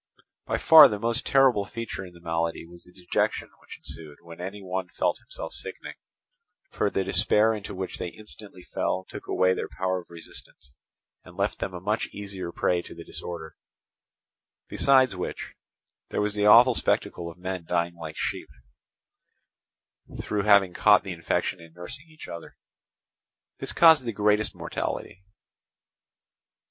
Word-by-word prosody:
By -, -, 0 dB
far 160 Hz, -2 st, +9 dB
the 105 Hz, -, -3 dB
most 115 Hz, +3 st, -1 dB
terrible 130 Hz, -6 st, +4 dB
feature 115 Hz, -4 st, -6 dB
in 90 Hz, -2 st, -11 dB
the 85 Hz, -, -15 dB
malady 85 Hz, 0 st, -2 dB
was 85 Hz, +1 st, -14 dB
the 90 Hz, -, -18 dB
dejection 90 Hz, -1 st, -1 dB
which -, -, -12 dB
ensued 75 Hz, -3 st, -9 dB
when 85 Hz, 0 st, -11 dB
any 95 Hz, +3 st, -6 dB
one 95 Hz, -1 st, -3 dB
felt -, -, -1 dB
himself -, -, -8 dB
sickening, -, -, -6 dB, 0.8 s
for -, -, 0 dB
the 95 Hz, -, -1 dB
despair 105 Hz, +3 st, +3 dB
into 105 Hz, -2 st, -6 dB
which 95 Hz, 0 st, -5 dB
they -, -, -3 dB
instantly 105 Hz, -1 st, -11 dB
fell 95 Hz, -, -2 dB
took -, -, -9 dB
away 95 Hz, 0 st, +3 dB
their -, -, -4 dB
power 95 Hz, 0 st, -2 dB
of -, -, -23 dB
resistance, 80 Hz, -5 st, -10 dB, 0.5 s
and -, -, -15 dB
left -, -, -1 dB
them 95 Hz, -, -4 dB
a -, -, -5 dB
much 105 Hz, +5 st, -1 dB
easier 95 Hz, -4 st, -7 dB
prey 90 Hz, +1 st, +1 dB
to -, -, -11 dB
the 85 Hz, -, -9 dB
disorder; 85 Hz, -3 st, -7 dB, 1.1 s
besides 130 Hz, -5 st, +3 dB
which, 90 Hz, -, -5 dB, 0.6 s
there -, -, -2 dB
was 105 Hz, 0 st, 0 dB
the 105 Hz, 0 st, +1 dB
awful 120 Hz, +4 st, +8 dB
spectacle 85 Hz, -6 st, -1 dB
of 85 Hz, -, -12 dB
men 90 Hz, -1 st, -4 dB
dying 85 Hz, 0 st, 0 dB
like 80 Hz, -2 st, -8 dB
sheep, -, -, -3 dB, 1.7 s
through 105 Hz, -, -1 dB
having 100 Hz, -3 st, +5 dB
caught 105 Hz, -1 st, +5 dB
the 95 Hz, -2 st, -5 dB
infection 85 Hz, +1 st, -2 dB
in 85 Hz, -1 st, -15 dB
nursing 130 Hz, -, -7 dB
each 155 Hz, 0 st, -12 dB
other. 85 Hz, -1 st, -9 dB, 1.0 s
This -, -, -1 dB
caused 160 Hz, -5 st, +6 dB
the 115 Hz, -, -2 dB
greatest 105 Hz, +1 st, +1 dB
mortality. 95 Hz, -, -5 dB
95 Hz, 155 wpm, -26 LUFS, 85-105 Hz, 1.7 s, far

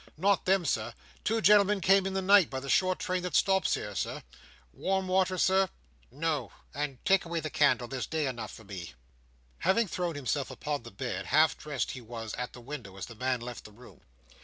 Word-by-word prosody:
"Not 195 Hz, +3 st, +2 dB
then, 190 Hz, -1 st, +3 dB
sir. 115 Hz, -4 st, -1 dB, 0.3 s
Two 225 Hz, +1 st, +1 dB
gentlemen 205 Hz, +1 st, +5 dB
came 195 Hz, +1 st, +4 dB
in 195 Hz, -, -3 dB
the 190 Hz, -, 0 dB
night 195 Hz, -3 st, +6 dB
by 130 Hz, -, -3 dB
the 140 Hz, +1 st, -4 dB
short 185 Hz, -1 st, +3 dB
train 185 Hz, 0 st, -2 dB
that 180 Hz, 0 st, -3 dB
stops 190 Hz, -1 st, +3 dB
here, 105 Hz, -, -5 dB
Sir. 95 Hz, -, -3 dB, 0.5 s
Warm 190 Hz, -, -1 dB
water, 185 Hz, 0 st, +2 dB
Sir?" 190 Hz, +1 st, +3 dB, 0.4 s
"No; 145 Hz, -3 st, -2 dB, 0.2 s
and 145 Hz, -2 st, -3 dB
take 195 Hz, -1 st, +4 dB
away 170 Hz, 0 st, -3 dB
the 155 Hz, -1 st, -5 dB
candle. 140 Hz, -4 st, +3 dB
There's 130 Hz, 0 st, -4 dB
day 160 Hz, -2 st, -1 dB
enough 120 Hz, -5 st, -4 dB
for 115 Hz, -, -12 dB
me." 90 Hz, -, -8 dB, 0.6 s
Having 195 Hz, +3 st, +2 dB
thrown 175 Hz, -2 st, -2 dB
himself 140 Hz, 0 st, -2 dB
upon 150 Hz, -2 st, -3 dB
the 120 Hz, -, -10 dB
bed, 95 Hz, -1 st, -4 dB
half 155 Hz, +1 st, +4 dB
dressed 145 Hz, -7 st, -3 dB
he 130 Hz, -, -7 dB
was 115 Hz, -1 st, -7 dB
at 125 Hz, 0 st, -4 dB
the 125 Hz, -, -11 dB
window 120 Hz, -7 st, -8 dB
as 95 Hz, -, -5 dB
the 115 Hz, -, -11 dB
man 125 Hz, +2 st, -1 dB
left 120 Hz, 0 st, -7 dB
the 105 Hz, -, -12 dB
room. 120 Hz, +4 st, -16 dB
150 Hz, 210 wpm, -30 LUFS, 120-185 Hz, 0.6 s, night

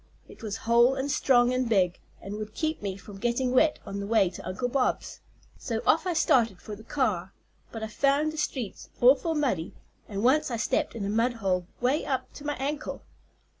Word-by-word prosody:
It -, -, -15 dB
was 215 Hz, -2 st, -4 dB
whole 235 Hz, +3 st, +5 dB
and 270 Hz, +1 st, -2 dB
strong 245 Hz, -2 st, +3 dB
and 255 Hz, -2 st, 0 dB
big, 185 Hz, -5 st, +2 dB, 0.2 s
and 195 Hz, -, -6 dB
would 215 Hz, 0 st, -7 dB
keep 315 Hz, 0 st, -2 dB
me 195 Hz, -2 st, -3 dB
from 195 Hz, 0 st, -11 dB
getting 240 Hz, +3 st, 0 dB
wet 300 Hz, +4 st, +4 dB
on 200 Hz, 0 st, -5 dB
the 200 Hz, -, -4 dB
way 205 Hz, -5 st, +3 dB
to 175 Hz, -, -9 dB
Uncle 185 Hz, +7 st, -2 dB
Bob's. 255 Hz, +1 st, -1 dB, 0.4 s
So 230 Hz, -3 st, -2 dB
off 330 Hz, +4 st, +3 dB
I 360 Hz, -, +1 dB
started 240 Hz, -, +3 dB
for 210 Hz, -, -8 dB
the 215 Hz, -, -13 dB
car, 215 Hz, -8 st, -1 dB, 0.4 s
but 225 Hz, -1 st, -6 dB
I -, -, -2 dB
found 280 Hz, +7 st, +1 dB
the -, -, -8 dB
streets 250 Hz, -9 st, -4 dB
awful 275 Hz, +6 st, +4 dB
muddy, 250 Hz, -, -1 dB, 0.3 s
and 200 Hz, 0 st, -3 dB
once 270 Hz, +5 st, +3 dB
I 235 Hz, -, -2 dB
stepped 225 Hz, -, 0 dB
in 210 Hz, -4 st, -3 dB
a -, -, -2 dB
mud 230 Hz, +3 st, +2 dB
hole 185 Hz, -6 st, -1 dB
way 260 Hz, +5 st, +2 dB
up 260 Hz, -2 st, -3 dB
to 290 Hz, -, -10 dB
my 295 Hz, -, -1 dB
ankle. 285 Hz, +3 st, -4 dB
240 Hz, 205 wpm, -27 LUFS, 205-270 Hz, 0.4 s, whole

